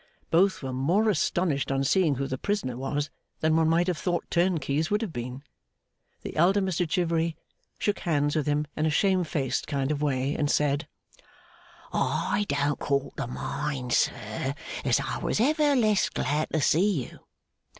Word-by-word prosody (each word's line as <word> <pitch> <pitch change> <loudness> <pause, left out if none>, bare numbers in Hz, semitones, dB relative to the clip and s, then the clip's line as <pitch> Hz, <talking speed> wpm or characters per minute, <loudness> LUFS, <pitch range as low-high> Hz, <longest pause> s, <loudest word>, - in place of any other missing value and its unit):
Both 185 0 +3
were 130 -1 -3
more 175 +12 +2
astonished 160 -5 0
on 135 0 +1
seeing 160 0 +3
who 135 +2 -2
the 130 -1 -4
prisoner 200 - -1
was, 145 +3 -2 0.3
than 160 0 +3
one 160 0 +3
might 170 +2 +3
have 175 -3 -1
thought 175 -2 -1
turnkeys 160 -4 +1
would 210 +2 +1
have 195 -7 -5
been. 125 +3 -6 0.8
The - - -6
elder 180 +6 +4
Mr 180 -3 -1
Chivery 165 -2 0 0.4
shook 205 - 0
hands 145 -3 0
with 155 -1 0
him 150 +1 +1
in 155 +1 +1
a - - +2
shame 185 +3 +2
faced 145 -5 -2
kind 140 -1 -1
of 150 -1 -2
way, 135 -1 0
and 145 -2 0
said, 145 +1 +1 1.1
'I 205 - 0
don't 145 0 0
call 140 0 0
to - - -2
mind, 130 0 -3
sir, 110 +6 0 0.3
as - - +3
I - - -3
was - - -1
ever 295 +3 +3
less 215 -5 +3
glad 150 +3 -1
to 160 - 0
see 170 -1 +3
you. - - -13
155 Hz, 170 wpm, -27 LUFS, 140-180 Hz, 1.1 s, elder